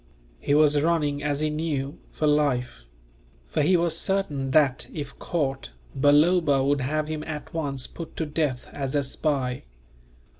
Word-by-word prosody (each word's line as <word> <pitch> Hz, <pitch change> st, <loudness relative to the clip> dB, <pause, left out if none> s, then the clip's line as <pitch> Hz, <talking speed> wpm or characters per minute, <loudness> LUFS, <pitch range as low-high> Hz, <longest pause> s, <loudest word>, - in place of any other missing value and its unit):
He 145 Hz, -, +1 dB
was 150 Hz, -1 st, +4 dB
running, 150 Hz, -3 st, +1 dB
as 145 Hz, 0 st, -1 dB
he 155 Hz, 0 st, 0 dB
knew, 150 Hz, -3 st, -3 dB
for 155 Hz, -, -2 dB
life; 140 Hz, -, +1 dB, 0.6 s
for -, -, -1 dB
he 180 Hz, +5 st, +4 dB
was 170 Hz, -1 st, +1 dB
certain 150 Hz, -9 st, -1 dB
that, 135 Hz, -2 st, +3 dB
if 145 Hz, -3 st, -7 dB
caught, 135 Hz, -, -2 dB, 0.3 s
Balloba 145 Hz, +1 st, +4 dB
would 140 Hz, 0 st, +2 dB
have 150 Hz, +4 st, -1 dB
him 155 Hz, -1 st, -4 dB
at 150 Hz, -1 st, -6 dB
once 140 Hz, -5 st, -2 dB
put 165 Hz, -2 st, -9 dB
to 160 Hz, -, -1 dB
death 150 Hz, -4 st, -2 dB
as 135 Hz, -1 st, -3 dB
a 145 Hz, -, +2 dB
spy. 135 Hz, -, -2 dB
145 Hz, 155 wpm, -25 LUFS, 135-155 Hz, 0.6 s, was